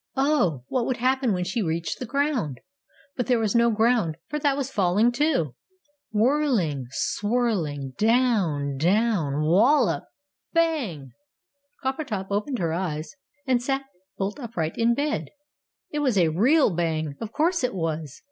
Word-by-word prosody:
Oh! 265 Hz, -, +2 dB
what 245 Hz, -, -1 dB
would 255 Hz, -, -1 dB
happen 260 Hz, 0 st, +1 dB
when 180 Hz, -2 st, 0 dB
she 195 Hz, +6 st, -2 dB
reached 165 Hz, -2 st, -2 dB
the 250 Hz, -, -5 dB
ground? 270 Hz, -, -1 dB, 0.6 s
But 250 Hz, -, -2 dB
there 250 Hz, -2 st, +3 dB
was 220 Hz, -3 st, 0 dB
no 235 Hz, 0 st, +4 dB
ground, 220 Hz, -7 st, +2 dB
for 300 Hz, -, -2 dB
that 280 Hz, -1 st, +1 dB
was 275 Hz, -1 st, -3 dB
falling, 205 Hz, +4 st, +3 dB
too! 255 Hz, -, +1 dB, 0.6 s
Whirling! 215 Hz, -, +1 dB
Swirling! 175 Hz, -, -1 dB
Down! 210 Hz, -, +2 dB
DOWN! 175 Hz, -5 st, +1 dB
WALLOP! 225 Hz, -, +3 dB, 0.5 s
BANG!! 255 Hz, -, 0 dB, 0.7 s
Coppertop 260 Hz, -8 st, -3 dB
opened 210 Hz, +6 st, -1 dB
her 165 Hz, -5 st, -1 dB
eyes, 165 Hz, -3 st, -3 dB, 0.3 s
and 255 Hz, -3 st, +2 dB
sat 270 Hz, +2 st, -1 dB, 0.3 s
bolt 200 Hz, +6 st, -3 dB
upright 180 Hz, -, -3 dB
in 235 Hz, +1 st, +2 dB
bed! 295 Hz, +3 st, -1 dB, 0.6 s
"It 300 Hz, -, -2 dB
was 260 Hz, -8 st, +1 dB
a 170 Hz, -3 st, +4 dB
REAL 235 Hz, -, +3 dB
Bang! 160 Hz, -3 st, -1 dB
Of 225 Hz, -1 st, -5 dB
course 335 Hz, +3 st, +1 dB
it 250 Hz, -5 st, 0 dB
was! 160 Hz, -4 st, -3 dB
220 Hz, 145 wpm, -25 LUFS, 165-260 Hz, 0.7 s, no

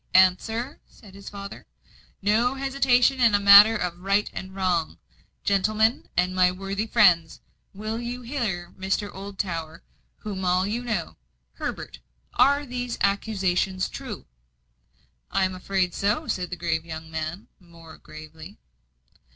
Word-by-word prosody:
"Answer," 220 Hz, +8 st, +2 dB
said 205 Hz, -5 st, -17 dB
his 200 Hz, 0 st, -10 dB
father. 200 Hz, 0 st, -9 dB, 0.6 s
"No 230 Hz, +6 st, +2 dB
hesitation 270 Hz, -1 st, +2 dB
in 230 Hz, -4 st, +5 dB
a -, -, +3 dB
matter 200 Hz, +2 st, +8 dB
of 175 Hz, -3 st, -4 dB
right 200 Hz, +3 st, +1 dB
and 190 Hz, 0 st, -7 dB
wrong. 175 Hz, -, 0 dB, 0.5 s
Gentlemen, 215 Hz, +3 st, +1 dB
and 180 Hz, +1 st, +2 dB
my 180 Hz, -1 st, +4 dB
worthy 195 Hz, +3 st, -4 dB
friends, 180 Hz, -8 st, +4 dB, 0.3 s
will 215 Hz, +3 st, -5 dB
you 245 Hz, +1 st, -5 dB
hear 215 Hz, -9 st, -3 dB
Mr. 195 Hz, +2 st, -2 dB
Oldtower, 180 Hz, -5 st, -5 dB, 0.3 s
whom 205 Hz, -3 st, -6 dB
you 190 Hz, -, -3 dB
all 180 Hz, +1 st, +2 dB
know? 215 Hz, -4 st, -3 dB, 0.4 s
Herbert, 70 Hz, -, -6 dB, 0.3 s
are 280 Hz, +3 st, +3 dB
these 245 Hz, -2 st, -4 dB
accusations 195 Hz, -2 st, 0 dB
true?" -, -, -8 dB, 1.0 s
"I 190 Hz, -, +1 dB
am 185 Hz, -, -2 dB
afraid 185 Hz, -1 st, -1 dB
so," 210 Hz, +11 st, -1 dB
said 180 Hz, -2 st, -2 dB
the 180 Hz, -, -4 dB
grave 165 Hz, -2 st, -2 dB
young 160 Hz, -1 st, -8 dB
man, 160 Hz, +5 st, -5 dB
more 170 Hz, -3 st, -15 dB
gravely. 155 Hz, +4 st, -12 dB
195 Hz, 135 wpm, -25 LUFS, 180-220 Hz, 1.0 s, matter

